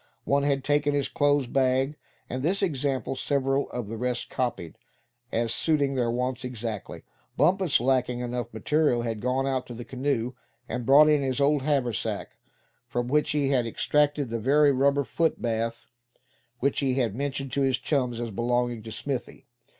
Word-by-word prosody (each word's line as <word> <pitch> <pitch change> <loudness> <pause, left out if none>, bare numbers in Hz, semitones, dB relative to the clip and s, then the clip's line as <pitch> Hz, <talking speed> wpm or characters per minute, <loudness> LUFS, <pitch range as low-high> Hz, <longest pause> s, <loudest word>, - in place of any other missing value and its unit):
One 140 0 +2
had 140 -1 0
taken 145 0 +1
his 140 -2 +1
clothes 145 -1 +2
bag, 130 +2 +1 0.3
and 130 +1 -4
this 190 +8 0
example 135 -6 -1
several 135 +1 0
of 125 -4 -5
the 115 +2 -5
rest 125 +1 -2
copied, 120 -10 -3 0.5
as 115 0 0
suiting 145 -4 +1
their 125 -3 0
wants 125 +2 -2
exactly. 115 -4 -5 0.3
Bumpus, 190 -3 +3
lacking 125 0 +1
enough 120 -1 -3
material, 120 +2 +1
had 115 -2 -3
gone 130 +2 0
out 130 -2 -1
to 120 - -8
the 120 +1 -8
canoe 130 -2 -1 0.3
and 120 -2 -4
brought 145 +3 +8
in 150 -1 +4
his 130 0 -1
old 145 0 +3
haversack, 130 -6 -1 0.5
from 120 0 -2
which 150 +2 +2
he 140 -2 +1
extracted 145 +3 +1
the 115 - -1
very 145 +5 +4
rubber 140 +1 +2
foot 140 +7 0
bath 115 0 -2 0.8
which 140 +2 +1
he 135 -3 +1
had 120 -6 0
mentioned 135 0 -3
to 140 - 0
his 135 -2 +2
chums 125 -5 -1
as 120 -1 -3
belonging 120 +1 0
to 110 +1 -9
Smithy. 135 +2 -5
130 Hz, 165 wpm, -26 LUFS, 120-140 Hz, 0.8 s, brought